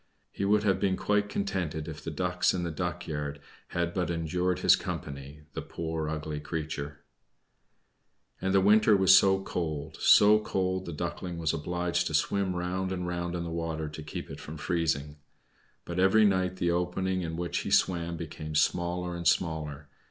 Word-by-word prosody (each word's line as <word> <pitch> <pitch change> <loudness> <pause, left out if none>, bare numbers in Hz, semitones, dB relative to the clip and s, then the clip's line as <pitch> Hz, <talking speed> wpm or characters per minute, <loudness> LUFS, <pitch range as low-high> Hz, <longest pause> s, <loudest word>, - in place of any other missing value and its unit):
He 100 - -3
would 105 +1 +3
have 95 -3 +2
been 95 -2 +1
quite 105 0 +1
contented 90 -7 -2
if 75 -2 -7
the - - -4
Ducks 90 +4 +1
in 90 - -2
the 85 - -2
duck 85 +1 -3
yard 75 -2 -4 0.3
had 85 0 -2
but 90 -2 -1
endured 85 +2 0
his - - +7
company 70 +1 -6
the - - -4
poor, 80 -2 -4
ugly 75 -1 -4
creature. 75 -2 -5 1.4
And 95 - 0
the 95 0 +4
winter 105 +1 +5
was 95 0 +7
so 95 0 +4
cold, 80 -6 -4
so 105 +1 +7
cold, 95 -3 -1
the - - -3
Duckling 85 +3 -4
was 80 -2 0
obliged 90 +2 -1
to 80 - -1
swim 95 +3 +1
round 90 +2 -2
and 90 -1 -2
round 85 0 -3
in 85 - -2
the 85 - -5
water 80 -2 -3
to 75 +1 -8
keep 75 - -7
it - - -8
from 80 +1 -8
freezing. 75 -3 -1 0.7
But 85 +1 -3
every 95 +4 +5
night 95 -2 +2
the 85 -2 0
opening 90 +2 0
in 80 -1 -4
which 85 0 -2
he - - -4
swam 85 -2 +2
became 75 -1 -6
smaller 85 +3 +1
and 85 -1 -2
smaller. 75 -4 0
85 Hz, 180 wpm, -29 LUFS, 80-95 Hz, 1.4 s, his